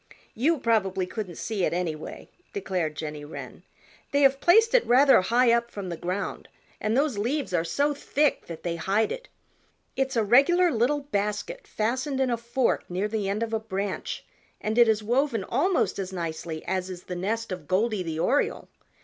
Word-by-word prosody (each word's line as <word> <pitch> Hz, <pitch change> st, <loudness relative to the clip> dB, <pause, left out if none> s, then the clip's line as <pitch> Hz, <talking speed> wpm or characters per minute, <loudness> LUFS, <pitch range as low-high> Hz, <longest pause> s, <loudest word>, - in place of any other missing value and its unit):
"You 310 Hz, +8 st, +2 dB
probably 195 Hz, -7 st, +1 dB
couldn't 185 Hz, -2 st, -6 dB
see 215 Hz, -4 st, -2 dB
it, -, -, +1 dB
anyway," 165 Hz, -3 st, -4 dB, 0.3 s
declared 180 Hz, -, -2 dB
Jenny 150 Hz, -1 st, -5 dB
Wren. 145 Hz, -, -9 dB, 0.5 s
"They 285 Hz, -, +2 dB
have 270 Hz, 0 st, +5 dB
placed 445 Hz, +6 st, +5 dB
it -, -, +5 dB
rather 265 Hz, -1 st, +6 dB
high 235 Hz, +5 st, +3 dB
up 235 Hz, 0 st, +2 dB
from 200 Hz, -5 st, -6 dB
the 170 Hz, -, -3 dB
ground 180 Hz, +4 st, -4 dB, 0.3 s
and 215 Hz, +3 st, 0 dB
those 275 Hz, -7 st, +1 dB
leaves 255 Hz, +1 st, -1 dB
are 165 Hz, -2 st, +2 dB
so 285 Hz, -, +1 dB
thick 290 Hz, +1 st, 0 dB
that 165 Hz, -2 st, -8 dB
they 170 Hz, -1 st, -2 dB
hide 205 Hz, +5 st, +1 dB
it. -, -, -6 dB, 0.7 s
It's 265 Hz, -1 st, -1 dB
a 225 Hz, -, +3 dB
regular 305 Hz, -, +5 dB
little 255 Hz, +5 st, +1 dB
basket 245 Hz, -, -3 dB
fastened 260 Hz, +5 st, -1 dB
in 260 Hz, -2 st, +2 dB
a 235 Hz, -, +1 dB
fork 235 Hz, +2 st, -1 dB
near 185 Hz, +4 st, -1 dB
the 210 Hz, -2 st, -2 dB
end 210 Hz, +3 st, -1 dB
of 225 Hz, -1 st, -4 dB
a 225 Hz, -, +1 dB
branch 200 Hz, -2 st, -4 dB, 0.3 s
and 215 Hz, +1 st, -2 dB
it 240 Hz, -, +7 dB
is 215 Hz, -1 st, +2 dB
woven 240 Hz, -1 st, +1 dB
almost 295 Hz, -, +1 dB
as 190 Hz, -1 st, -4 dB
nicely 165 Hz, -2 st, -5 dB
as 185 Hz, 0 st, -2 dB
is 180 Hz, -1 st, -8 dB
the 180 Hz, -, -6 dB
nest 220 Hz, +5 st, -2 dB
of 180 Hz, -5 st, -6 dB
Goldy 210 Hz, +3 st, +1 dB
the 165 Hz, -3 st, -4 dB
Oriole. 265 Hz, -, 0 dB
220 Hz, 185 wpm, -26 LUFS, 185-265 Hz, 0.7 s, it